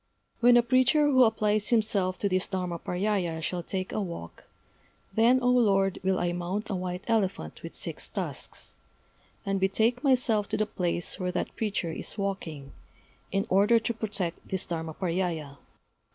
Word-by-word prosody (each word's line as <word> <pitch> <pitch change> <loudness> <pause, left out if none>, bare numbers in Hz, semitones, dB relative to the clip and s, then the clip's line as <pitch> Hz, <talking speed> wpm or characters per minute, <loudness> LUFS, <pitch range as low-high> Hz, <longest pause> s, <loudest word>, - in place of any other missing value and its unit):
'When 240 0 +6
a 240 - +5
preacher 255 +4 +4
who 260 -3 +6
applies 215 -1 +1
himself 205 -5 +2
to 205 - +2
this 185 -1 0
Dharmaparyâya 180 -1 -1
shall 180 +2 -2
take 185 +2 -4
a 215 - -1
walk, 170 - -7 0.7
then, 230 +5 +5
O 245 - +4
Lord, 195 -6 +3
will 190 0 +1
I 175 0 0
mount 180 +5 -3
a - - 0
white 180 +1 -4
elephant 195 - -1
with - - -8
six - - -6
tusks, - - -6 0.7
and 195 0 0
betake 220 +7 +1
myself 250 -6 +2
to - - -1
the 215 - +1
place 175 -4 -2
where 180 -1 -1
that - - -3
preacher 205 -6 -2
is 160 - -4
walking, 165 -8 -4 0.6
in 195 +2 0
order 205 +4 +4
to 230 +1 -1
protect 200 -6 -4
this 190 -2 -1
Dharmaparyâya. 165 -3 -3
195 Hz, 155 wpm, -28 LUFS, 180-220 Hz, 0.7 s, When